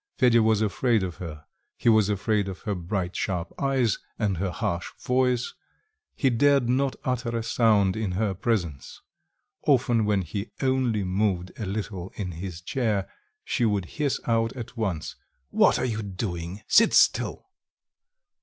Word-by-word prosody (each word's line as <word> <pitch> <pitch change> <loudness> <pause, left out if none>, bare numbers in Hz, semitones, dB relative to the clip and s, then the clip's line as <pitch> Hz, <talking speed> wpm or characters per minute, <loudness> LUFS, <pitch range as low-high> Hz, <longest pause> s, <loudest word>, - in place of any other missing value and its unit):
Fedya 120 -2 +5
was 110 -1 +3
afraid 110 +1 +1
of 90 -4 -4
her: 75 -4 -8 0.3
he - - -3
was 110 -3 +5
afraid 105 0 0
of 95 -1 -6
her 105 - -2
bright 90 0 -3
sharp 90 -4 -2
eyes 135 -6 +1 0.2
and 100 -5 0
her 95 +2 -1
harsh 85 0 -2
voice; 125 -1 +1 0.6
he 135 -4 +2
dared 140 +1 +3
not 130 +2 +1
utter 125 -2 -1
a 115 - -2
sound 110 -4 +3
in 110 -4 -2
her 100 +1 0
presence; 90 - -3 0.6
often, 120 -5 +3
when 100 -2 +1
he 100 +5 -5
only 130 -6 +1
moved 95 -1 0
a 105 - -3
little 95 -2 -4
in 95 -4 -4
his 85 0 -7
chair, 105 -2 -1 0.4
she 125 - 0
would 105 -5 +1
hiss 145 - -1
out 115 -1 +1
at 120 -1 -8
once: 95 -9 -3 0.3
"What - - +4
are - - -1
you 110 -3 -2
doing? 95 -2 -5
sit - - +5
still." - - +2
105 Hz, 155 wpm, -26 LUFS, 95-120 Hz, 0.6 s, Fedya